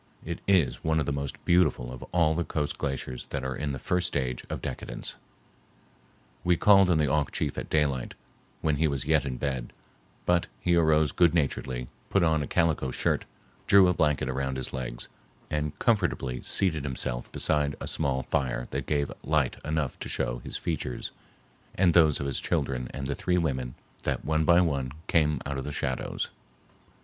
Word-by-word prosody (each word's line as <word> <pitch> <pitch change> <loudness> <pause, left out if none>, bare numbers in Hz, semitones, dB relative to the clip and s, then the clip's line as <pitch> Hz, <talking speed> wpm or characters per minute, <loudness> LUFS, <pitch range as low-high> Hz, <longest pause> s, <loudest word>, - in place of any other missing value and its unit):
It 85 +1 -4
is 95 -8 +3
one 80 0 +2
of 75 - 0
the - - -1
most 70 -1 -3
beautiful 85 -8 +3
of 65 - -9
all 85 -3 +3
the 85 +2 0
coast 75 -3 -2
glaciers 65 -2 -3
that 70 -2 -4
are 65 0 -2
in 75 -1 -2
the 65 - -3
first 90 +7 0
stage 65 -3 -2
of - - -3
decadence. - - -5 1.3
We 90 -1 +3
called 100 -1 +6
on 85 - +4
the 75 -1 +2
Auk 75 0 +1
chief - - -2
at - - -5
daylight, 70 -5 0 0.5
when 75 -2 +1
he 80 +2 +3
was 70 -3 -2
yet 75 -3 +2
in 65 -2 -3
bed, 65 -4 -3 0.5
but 90 -1 +2
he 85 -1 +2
arose 80 -2 +4
goodnaturedly, 70 -7 +1 0.2
put 100 - +3
on 80 -2 +3
a 70 - -3
calico 80 -6 +1
shirt, - - 0 0.4
drew 95 -2 +7
a 90 - +3
blanket 75 -4 +1
around 65 -1 -2
his 65 - -3
legs, 60 -2 -4 0.4
and 75 -1 -2
comfortably 70 - +1
seated 80 -7 0
himself 65 -3 -3
beside 75 -2 +1
a - - -5
small 70 -4 0
fire 60 -2 -1
that - - -3
gave 70 -2 0
light 75 -4 +1
enough 75 -3 -2
to - - -5
show - - -1
his - - -5
features 60 - -3 0.6
and 90 -2 +4
those 80 -4 +5
of 70 - -3
his 70 - -2
children 65 -2 -1
and 70 - -5
the 70 - -1
three 90 +6 0
women 65 -7 -1 0.3
that - - -2
one 80 0 +1
by 85 +2 +6
one 70 -6 0
came 75 -4 +2
out 70 -1 -2
of - - -4
the 75 - -4
shadows. 65 -3 -2
75 Hz, 185 wpm, -28 LUFS, 65-80 Hz, 1.3 s, drew